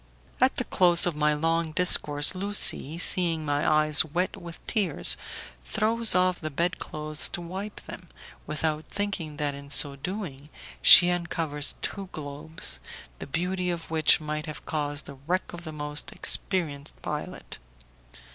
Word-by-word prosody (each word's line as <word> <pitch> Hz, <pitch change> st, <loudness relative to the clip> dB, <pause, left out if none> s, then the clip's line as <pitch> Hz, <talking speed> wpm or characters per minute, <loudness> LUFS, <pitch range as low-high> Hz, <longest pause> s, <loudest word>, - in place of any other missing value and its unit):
At -, -, +4 dB
the -, -, +1 dB
close 175 Hz, -2 st, +4 dB
of 175 Hz, -3 st, -1 dB
my 150 Hz, 0 st, +1 dB
long 165 Hz, +1 st, -1 dB
discourse 150 Hz, -4 st, +4 dB
Lucie, 190 Hz, -5 st, +3 dB
seeing 170 Hz, -3 st, 0 dB
my 145 Hz, +1 st, 0 dB
eyes 155 Hz, -1 st, +4 dB
wet 175 Hz, +4 st, -2 dB
with 170 Hz, -1 st, -11 dB
tears, 205 Hz, -4 st, +2 dB, 0.5 s
throws 220 Hz, 0 st, +2 dB
off 180 Hz, 0 st, +2 dB
the 155 Hz, -, -4 dB
bed 170 Hz, +5 st, -2 dB
clothes 155 Hz, 0 st, -1 dB
to -, -, -5 dB
wipe 190 Hz, +5 st, -7 dB
them, 175 Hz, -3 st, -11 dB, 0.4 s
without 155 Hz, 0 st, -2 dB
thinking 195 Hz, -7 st, -4 dB
that 145 Hz, -1 st, -2 dB
in 140 Hz, 0 st, -11 dB
so 140 Hz, 0 st, +2 dB
doing 150 Hz, -3 st, -7 dB, 0.3 s
she 175 Hz, 0 st, +9 dB
uncovers 165 Hz, -4 st, -3 dB
two 195 Hz, -2 st, -5 dB
globes, 145 Hz, -, -5 dB, 0.4 s
the -, -, -7 dB
beauty 180 Hz, +4 st, -2 dB
of 170 Hz, -2 st, -5 dB
which 160 Hz, -2 st, +4 dB
might 150 Hz, 0 st, -5 dB
have 155 Hz, -, -8 dB
caused 145 Hz, -2 st, -3 dB
the 140 Hz, -2 st, -11 dB
wreck 185 Hz, +1 st, -2 dB
of 175 Hz, 0 st, -9 dB
the 160 Hz, -, -6 dB
most 150 Hz, -1 st, -3 dB
experienced 155 Hz, -7 st, 0 dB
pilot. -, -, -6 dB
160 Hz, 150 wpm, -26 LUFS, 150-180 Hz, 0.5 s, she